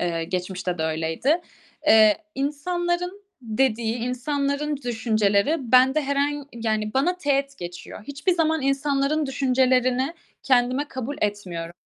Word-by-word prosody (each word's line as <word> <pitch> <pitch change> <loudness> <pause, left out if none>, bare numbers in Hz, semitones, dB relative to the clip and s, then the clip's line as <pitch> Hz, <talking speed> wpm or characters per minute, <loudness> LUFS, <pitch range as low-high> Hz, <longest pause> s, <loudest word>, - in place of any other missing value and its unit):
eee, 165 -2 -1
geçmişte 180 0 -3
de - - -1
öyleydi. 160 - 0 0.5
Eee, 215 -1 +6 0.2
insanların 350 +7 -2 0.2
dediği, 230 0 0
insanların 280 +4 -1
düşünceleri 225 +1 +1 0.2
bende 265 +4 +5
herhan 285 +1 -1
yani 215 -1 -2
bana 345 +7 +2
teğet 275 -2 0
geçiyor. 175 +3 -8
Hiçbir 285 +6 0
zaman 320 -3 +1
insanların 275 +2 +1
düşüncelerini 260 +1 +2 0.3
kendime 255 +2 +2
kabul 260 +2 -5
etmiyoru 180 -5 -3
260 Hz, 110 wpm, -24 LUFS, 215-285 Hz, 0.5 s, Eee